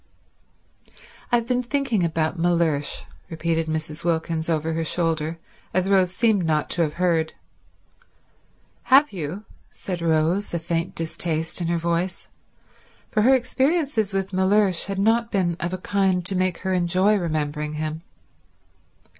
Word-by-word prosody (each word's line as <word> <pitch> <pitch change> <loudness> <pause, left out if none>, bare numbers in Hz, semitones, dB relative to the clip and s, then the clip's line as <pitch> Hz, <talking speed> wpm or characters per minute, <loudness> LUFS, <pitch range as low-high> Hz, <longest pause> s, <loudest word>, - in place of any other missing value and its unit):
"I've 235 -1 +3
been 250 0 +1
thinking 250 -5 0
about 160 0 0
Mellersh," 165 -4 +1 0.3
repeated 165 -1 -1
Mrs. 155 -1 -4
Wilkins 165 -1 -1
over 160 0 0
her 165 0 -1
shoulder, 165 -1 -1 0.4
as 185 +1 +1
Rose 185 -2 +4
seemed 215 -1 +2
not 155 -2 0
to 175 - +1
have 155 -2 +1
heard. 170 -3 +1 1.5
"Have 275 -1 +5
you?" 180 +4 -5 0.2
said 180 -3 -6
Rose, 165 +4 +1
a - - +2
faint 170 +2 -2
distaste 165 0 -2
in 170 - -1
her 170 0 +1
voice, 170 +2 -2 0.8
for 215 - +2
her 260 +5 +6
experiences 265 - 0
with 195 0 -2
Mellersh 190 -1 +3
had 195 -1 -3
not 230 +3 +2
been 180 -4 +1
of 170 - -2
a 185 - -2
kind 185 -1 0
to 190 - -1
make 185 -1 0
her 190 - +1
enjoy 185 +4 +3
remembering 150 -4 -2
him. 155 +1 -3
175 Hz, 140 wpm, -23 LUFS, 160-195 Hz, 1.5 s, her